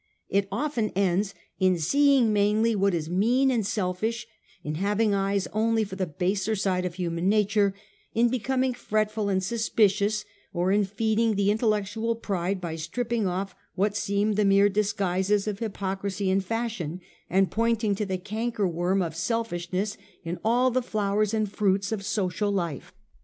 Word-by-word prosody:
It 200 0 +1
often 235 -1 -1
ends 195 +1 +1 0.2
in 185 -1 +3
seeing 265 - +3
mainly 210 +2 +2
what 200 -2 +2
is 160 -2 -3
mean 235 +10 +2
and 235 -4 +1
selflsh, 210 +4 -2 0.4
in 150 - -3
having 210 +1 +2
eyes 195 0 0
only 225 +1 +2
for 195 -2 -6
the 190 -1 -2
baser 190 +6 -1
side 185 -2 0
of 175 -2 -4
human 175 0 -1
nature, 205 -1 +2 0.4
in 235 +2 +4
becoming 255 +2 0
fretful 215 -3 -1
and 190 -1 +1
suspicious, 210 -1 +1 0.3
or 180 +1 +1
in 205 0 +3
feeding 220 +3 +1
an 200 - -3
intellectual 215 +2 +1
pride 195 -3 -2
by 165 -3 -4
stripping 225 +6 -2
off 185 +1 -3 0.2
what 200 +2 +1
seem 205 +1 0
the 210 +1 +2
mere 200 0 +5
disguises 200 -1 0
of 205 -2 -3
hypocrisy 195 -2 -2
and 195 0 +2
fashion, 215 -6 -3 0.3
and 190 -1 +2
pointing 225 -2 +1
to 210 +2 -2
the 190 -1 -1
cankerworm 195 -3 -1
of 160 -1 -6
selfishness 190 0 -2 0.3
in 170 +1 -4
all 245 +3 +3
the 255 +1 +1
flowers 210 -2 0
and 215 -2 -1
fruits 200 -1 +1
of 210 -3 -2
social 205 0 -1
life. 170 -8 -3
205 Hz, 155 wpm, -26 LUFS, 190-220 Hz, 0.4 s, mere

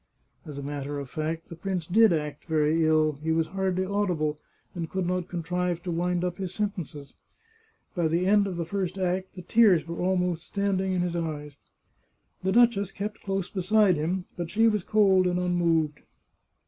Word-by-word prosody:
As 145 -2 -7
a 140 - -5
matter 145 0 -4
of 140 -3 -6
fact 160 +1 -3
the 170 - -8
prince 185 -1 -3
did 220 +4 +5
act 150 -3 -2
very 160 0 +2
ill; 155 -2 +2
he 160 +1 -1
was 160 0 +2
hardly 190 +1 -1
audible, 180 -7 -1 0.3
and 165 -3 -4
could 190 -1 -2
not 180 0 -1
contrive 175 0 -2
to 180 - -3
wind 175 +1 0
up 180 +1 -3
his 190 -1 -4
sen 210 -1 0
tences. 150 -6 -8 0.8
By 175 -4 +1
the 170 +3 +1
end 200 +1 +4
of 185 -3 -4
the 170 - -2
first 185 +1 -3
act 185 0 -2
the 180 - -8
tears 185 -6 +4
were 170 0 -5
almost 180 -2 0
standing 195 -2 0
in 180 - +1
his 175 -1 -1
eyes. 150 -4 -4 0.9
The 190 - 0
duchess 215 -3 +4
kept 210 +2 -5
close 195 -2 -2
beside 195 0 +3
him, 175 +4 -2
but 175 -2 -4
she 225 +4 +3
was 210 -4 +1
cold 195 -3 +4
and 180 0 0
unmoved. 170 -4 +1
180 Hz, 185 wpm, -27 LUFS, 160-190 Hz, 0.9 s, did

